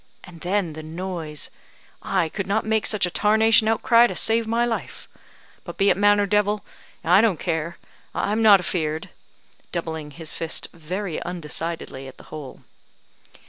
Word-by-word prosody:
And 170 -3 -13
then 180 -2 0
the 155 - -7
noise 160 -1 -6 0.5
I 165 - 0
could 195 +3 -4
not 210 +3 0
make 220 -1 +1
such 210 -3 +2
a 180 - -3
tarnation 220 +2 +4
outcry 230 +2 +5
to - - -5
save 225 0 +2
my 230 +1 +2
life. 235 -1 -4 0.6
But - - -9
be 200 0 +4
it - - +2
man 205 +1 +4
or 205 - +3
devil, 210 0 +1 0.4
I 180 +4 +6
don't 210 -8 +2
care, 165 -1 -2 0.4
I'm 215 +2 0
not 210 -3 +8
afear'd," 160 -3 -2 0.6
doubling 160 -3 -4
his 160 +2 -6
fist 165 -1 -3
very 175 +2 -4
undecidedly 165 -5 -4
at 130 - -12
the - - -14
hole. 150 -4 -8
185 Hz, 160 wpm, -23 LUFS, 160-210 Hz, 0.6 s, not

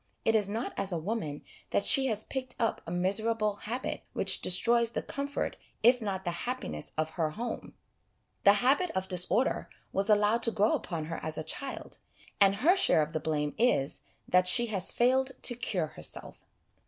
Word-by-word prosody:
It 225 - +3
is 210 -3 +1
not 225 +5 -4
as 195 0 -2
a 175 - -1
woman 160 -4 -4 0.3
that 200 - 0
she 270 -1 +7
has 220 -3 -2
picked 260 -2 -6
up 230 - -1
a - - -5
miserable 210 +4 0
habit 240 +6 -4
which - - +3
destroys 235 +5 +3
the - - -3
comfort, 280 +1 -4 0.3
if 245 +2 +5
not 195 -3 -3
the 175 - -1
happiness, 175 - -5
of 155 0 -1
her 160 -1 -1
home; 230 +9 -6 0.7
the 200 - +7
habit 290 +8 +3
of 190 0 -2
disorder 185 +7 +1 0.2
was 195 +2 +2
allowed 210 +2 +3
to 230 - +3
grow 210 0 +2
upon 165 -4 -3
her 165 +1 -5
as 155 -1 -4
a 155 - -3
child, 265 - -5 0.4
and 195 -1 +5
her 315 - +3
share 165 - +5
of 150 - -7
the 155 - -1
blame 150 -2 -2
is, 225 - +1 0.3
that 180 0 +3
she 240 +5 +6
has 195 -5 -1
failed 260 +2 +2
to 245 - +3
cure 190 -8 -2
herself. - - -7
210 Hz, 185 wpm, -29 LUFS, 175-240 Hz, 0.7 s, she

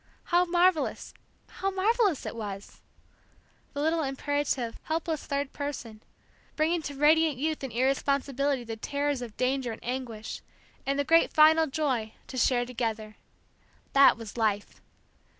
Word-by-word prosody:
How 355 +1 +5
marvellous 350 -2 +1 0.3
how 390 - -3
marvellous 395 - +1
it - - -5
was! 205 -3 -7 0.9
The 285 - -2
little 320 +2 +1
imperative, 275 -3 -2
helpless 320 0 -2
third 280 -1 -2
person, 255 -7 -6 0.5
bringing 325 +2 +1
to 290 -2 -6
radiant 305 0 +4
youth 310 +2 -2
and 265 - -4
irresponsibility 275 +1 0
the 225 -1 -6
terrors 285 +2 -2
of 235 -3 -8
danger 255 -1 0
and 220 - -9
anguish, 240 -4 -5 0.5
and 275 0 +1
the 285 - +2
great 330 +3 +4
final 315 +1 +6
joy, 265 -7 -1
to 260 - -8
share 245 0 +2
together. 225 -3 -4 0.8
That 275 -4 +7
was 225 -1 -9
life. 210 -3 -1
275 Hz, 135 wpm, -28 LUFS, 240-315 Hz, 0.9 s, That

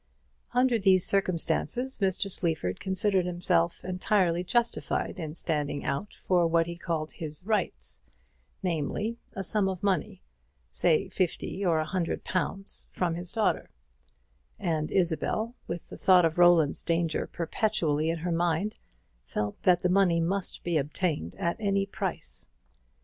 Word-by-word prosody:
Under 250 -1 +3
these 190 -2 +5
circumstances, 200 +7 +1
Mr. 195 0 +1
Sleaford 160 - 0
considered 190 -1 +1
himself 175 - 0
entirely 180 -1 +1
justified 235 0 -1
in 155 -2 -5
standing 150 -4 -2
out 140 +10 -3
for 175 -2 +2
what 165 0 +3
he 170 +1 -6
called 165 -3 -3
his 155 0 -5
rights, 65 - -1 0.6
namely, 185 +7 -2 0.2
a 195 - -3
sum 195 0 +3
of 185 -1 -5
money 185 - -1 0.5
say 165 0 +2
fifty 185 +1 -2
or 170 -4 +3
a 155 - 0
hundred 170 +1 -2
pounds 195 +1 -3
from 175 -2 -1
his 175 +1 -4
daughter; 220 -2 0 0.9
and 155 -2 -1
Isabel, 195 +6 0
with 170 0 -5
the - - -9
thought 180 -2 +5
of 165 +1 0
Roland's 175 -4 +5
danger 165 -1 0
perpetually 165 -4 0
in 165 - 0
her 175 +2 -3
mind, 170 +4 0 0.4
felt 105 +11 -4
that 180 -1 +3
the - - +4
money 180 -2 +3
must 185 +3 -2
be 170 -2 +1
obtained 145 - -2
at 170 - -1
any 200 -2 +1
price. 195 - -4
175 Hz, 140 wpm, -28 LUFS, 160-195 Hz, 0.9 s, these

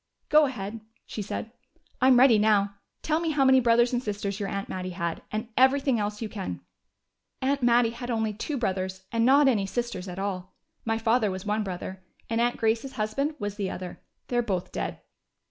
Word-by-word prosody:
"Go 305 -1 +6
ahead," 225 -3 -5 0.2
she 215 - -5
said. 215 +2 -5 0.5
"I'm 255 -1 +6
ready 245 -4 +7
now. 205 -2 +3 0.3
Tell 310 0 +1
me 335 -1 -1
how 290 -3 +2
many 265 0 +6
brothers 240 0 +3
and 245 - +1
sisters 205 -2 -3
your 200 -1 -2
aunt 200 0 -3
Mattie 185 -1 -5
had, 170 -2 -2
and 220 +2 -3
everything 265 -1 +4
else 210 +1 -2
you - - -2
can." 205 -3 -5 0.8
"Aunt 275 +1 0
Mattie 240 -1 +4
had 245 +1 -7
only 220 -2 0
two 275 +7 -3
brothers, 190 -4 -2
and 230 +1 +2
not 280 +2 +6
any 210 -7 +2
sisters 235 -3 -3
at 180 0 -7
all. 190 -2 -4 0.3
My 225 0 +1
father 225 -1 +2
was 185 0 -5
one 210 +1 0
brother, 185 0 -6 0.3
and 230 +1 +2
Aunt 240 0 +1
Grace's 230 +4 0
husband 265 +7 -1
was 205 -4 -4
the 195 -3 -1
other. 180 -1 -7 0.3
They're 240 -1 +1
both 190 -6 -2
dead." - - -4
225 Hz, 195 wpm, -27 LUFS, 200-245 Hz, 0.8 s, ready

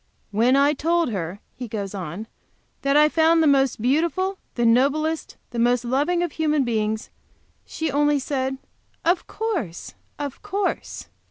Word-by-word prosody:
"When 235 +5 +3
I 280 +2 +4
told 330 -1 +1
her," 185 0 -4
he 250 -1 -6
goes 205 -3 -4
on, 185 +2 -5 0.6
"that 275 +1 +3
I 300 - +7
had 300 - +2
found 325 0 +4
the - - +3
most 275 -4 +3
beautiful, 340 - +1 0.2
the 240 - +1
noblest, 285 +7 +2
the 240 - -3
most 245 +1 +2
loving 295 +8 +1
of 345 - -2
human 305 -2 +1
beings, 220 -2 -1 0.6
she 320 -2 -3
only 295 +1 +3
said, 265 -1 -2 0.5
'Of 345 +2 +2
course, 220 - -4 0.2
of 285 -2 -5
course!' 405 -1 -3
275 Hz, 155 wpm, -23 LUFS, 235-320 Hz, 0.6 s, I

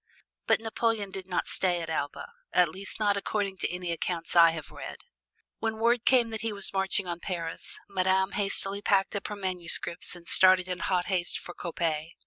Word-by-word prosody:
But - - +4
Napoleon 225 -2 -1
did 190 -1 -7
not 180 - -1
stay 180 -2 0
at 165 - -5
Elba, 145 - -4 0.2
at 180 -2 +4
least 190 +6 -5
not 205 -2 +2
according 200 -1 -2
to - - -2
any 180 -1 -4
accounts 170 0 -4
I 170 -1 +8
have 165 -1 -6
read. - - -8 0.6
When 225 -1 -2
word 235 +1 +1
came 240 -3 +4
that 220 - -4
he 225 0 -2
was 200 -1 +4
marching 190 0 +1
on 170 -1 -4
Paris, 170 -3 -5
Madame 190 0 +1
hastily 200 0 +2
packed 195 0 +1
up 200 - -3
her 210 - -5
manuscripts 180 -2 -1
and 175 -1 -14
started 185 -1 +6
in 180 -1 -4
hot 180 -2 0
haste 180 -3 -1
for 175 - -9
Coppet. 165 -2 -3
190 Hz, 190 wpm, -28 LUFS, 175-200 Hz, 0.6 s, I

